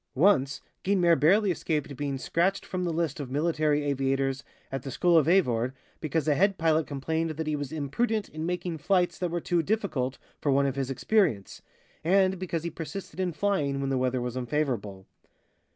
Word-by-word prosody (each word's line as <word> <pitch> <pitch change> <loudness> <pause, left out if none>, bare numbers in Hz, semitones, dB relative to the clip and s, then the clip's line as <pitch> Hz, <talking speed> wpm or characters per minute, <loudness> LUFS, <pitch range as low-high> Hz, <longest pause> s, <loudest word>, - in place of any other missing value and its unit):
Once, 140 -4 +3 0.2
Guynemer 180 -3 +4
barely 190 +7 +4
escaped 150 -4 -2
being 140 0 -2
scratched 175 +8 0
from 185 -1 -3
the 170 - 0
list 160 -2 -1
of 140 -3 -5
military 150 +1 +1
aviators 135 -1 0 0.3
at 135 -1 -3
the 135 - -6
school 175 +6 +2
of 160 -3 +5
Avord, 130 -9 +2 0.3
because 155 -1 -1
a 150 - +4
head 195 +6 +2
pilot 160 -1 +2
complained 160 +4 -2
that 160 +1 -4
he 155 0 0
was 145 -2 -4
imprudent 200 - -1
in 155 +1 -6
making 175 -1 -3
flights 180 +1 +1
that 180 - -1
were 175 +1 -1
too 170 0 +1
difficult 160 - -1 0.2
for 145 - +1
one 140 +1 +3
of 135 -1 -1
his 135 -1 -2
experience, 135 - 0 0.4
and 190 +2 +3
because 170 -3 -3
he 170 - -3
persisted 165 +5 -7
in 185 -1 0
flying 150 -7 0
when 135 0 -1
the 135 - +1
weather 130 0 0
was 125 0 -3
unfavorable. 120 -8 -2
155 Hz, 185 wpm, -28 LUFS, 135-175 Hz, 0.4 s, of